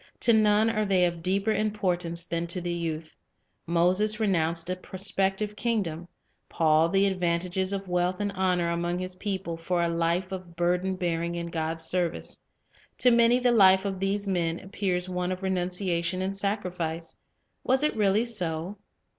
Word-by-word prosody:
To 235 Hz, -, +4 dB
none 215 Hz, 0 st, +4 dB
are 215 Hz, -1 st, 0 dB
they 190 Hz, -3 st, +3 dB
of 170 Hz, -1 st, -3 dB
deeper 195 Hz, +4 st, +1 dB
importance 180 Hz, -6 st, -1 dB
than 170 Hz, 0 st, -3 dB
to 170 Hz, +2 st, +1 dB
the 175 Hz, 0 st, -3 dB
youth. 160 Hz, -2 st, -4 dB, 0.5 s
Moses 185 Hz, +6 st, +2 dB
renounced 170 Hz, -5 st, +1 dB
a 185 Hz, -, -1 dB
prospective 195 Hz, +2 st, -1 dB
kingdom, 195 Hz, -8 st, -2 dB, 0.4 s
Paul 160 Hz, 0 st, +3 dB
the 195 Hz, +2 st, +3 dB
advantages 185 Hz, 0 st, 0 dB
of 195 Hz, -1 st, -4 dB
wealth 180 Hz, +1 st, 0 dB
and 205 Hz, -1 st, -1 dB
honor 185 Hz, -3 st, 0 dB
among 175 Hz, +1 st, -1 dB
his 185 Hz, 0 st, -3 dB
people, 190 Hz, -3 st, -4 dB
for 175 Hz, +2 st, -2 dB
a 170 Hz, -, +2 dB
life 170 Hz, +3 st, -1 dB
of 180 Hz, -3 st, -7 dB
burden 180 Hz, +2 st, 0 dB
bearing 170 Hz, -1 st, -2 dB
in 170 Hz, 0 st, -5 dB
God's 160 Hz, 0 st, -2 dB
service. 175 Hz, +1 st, -1 dB, 0.6 s
To 250 Hz, -, +4 dB
many 235 Hz, +1 st, +5 dB
the 250 Hz, -1 st, +2 dB
life 190 Hz, -3 st, +5 dB
of 195 Hz, -2 st, -3 dB
these 200 Hz, +1 st, 0 dB
men 170 Hz, -3 st, -1 dB
appears 190 Hz, -2 st, -2 dB
one 180 Hz, 0 st, -2 dB
of 185 Hz, +1 st, -5 dB
renunciation 180 Hz, -1 st, -1 dB
and 195 Hz, +1 st, -2 dB
sacrifice. 180 Hz, -5 st, -3 dB, 0.5 s
Was 265 Hz, +3 st, +2 dB
it 300 Hz, -, +1 dB
really 210 Hz, +1 st, +2 dB
so? 180 Hz, -4 st, -2 dB
185 Hz, 165 wpm, -27 LUFS, 170-200 Hz, 0.6 s, many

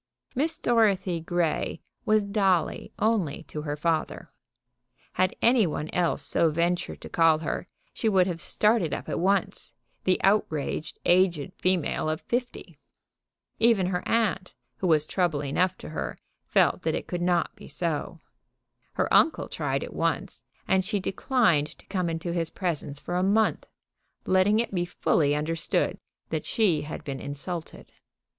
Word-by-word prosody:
Miss 310 Hz, +6 st, 0 dB
Dorothy 200 Hz, -7 st, +2 dB
Grey 170 Hz, -1 st, -1 dB, 0.3 s
was 215 Hz, -1 st, +3 dB
Dolly 195 Hz, -5 st, 0 dB
only 210 Hz, -10 st, 0 dB
to 150 Hz, -, -6 dB
her 145 Hz, -1 st, -3 dB
father. 160 Hz, +1 st, -2 dB, 0.8 s
Had 185 Hz, 0 st, +1 dB
any 235 Hz, -4 st, +5 dB
one 155 Hz, 0 st, -4 dB
else 175 Hz, -2 st, +1 dB
so 165 Hz, -, +2 dB
ventured 170 Hz, +3 st, -1 dB
to -, -, -8 dB
call 165 Hz, -2 st, +4 dB
her 155 Hz, -, -4 dB, 0.3 s
she 225 Hz, -, 0 dB
would 190 Hz, -3 st, +4 dB
have 170 Hz, -2 st, -3 dB
started 210 Hz, -6 st, +2 dB
up -, -, -7 dB
at -, -, -2 dB
once, 195 Hz, +2 st, 0 dB, 0.3 s
the 185 Hz, -, +2 dB
outraged 160 Hz, -7 st, 0 dB
aged 175 Hz, -5 st, +3 dB
female 180 Hz, -4 st, 0 dB
of 155 Hz, +1 st, -2 dB
fifty. 245 Hz, +1 st, -4 dB, 0.8 s
Even 225 Hz, -5 st, +4 dB
her 180 Hz, 0 st, -1 dB
aunt, 210 Hz, -5 st, 0 dB, 0.2 s
who 185 Hz, -, -1 dB
was 155 Hz, -3 st, +4 dB
trouble 170 Hz, -4 st, 0 dB
enough 175 Hz, +7 st, 0 dB
to -, -, -9 dB
her, -, -, -4 dB, 0.3 s
felt -, -, +3 dB
that -, -, 0 dB
it -, -, -4 dB
could 175 Hz, -2 st, -4 dB
not 175 Hz, -1 st, +1 dB
be -, -, -13 dB
so. 170 Hz, +1 st, -3 dB, 0.8 s
Her -, -, 0 dB
uncle 320 Hz, -, +4 dB
tried -, -, -2 dB
it -, -, -8 dB
once, -, -, -2 dB, 0.2 s
and 190 Hz, -1 st, +3 dB
she 205 Hz, +2 st, -1 dB
declined 185 Hz, -, +1 dB
to -, -, -20 dB
come 185 Hz, -3 st, -1 dB
into 165 Hz, +1 st, -3 dB
his 165 Hz, -2 st, -1 dB
presence 150 Hz, -5 st, -3 dB
for 175 Hz, +3 st, -3 dB
a 180 Hz, -, +1 dB
month, 215 Hz, +3 st, +2 dB, 0.6 s
letting 190 Hz, +3 st, +3 dB
it 235 Hz, -, -1 dB
be 175 Hz, -2 st, +1 dB
fully 150 Hz, -4 st, +1 dB
understood 160 Hz, +2 st, -1 dB, 0.3 s
that -, -, -2 dB
she 195 Hz, -10 st, +2 dB
had 155 Hz, -, -7 dB
been 135 Hz, -2 st, -5 dB
insulted. 155 Hz, +5 st, -6 dB
180 Hz, 155 wpm, -27 LUFS, 160-200 Hz, 0.8 s, any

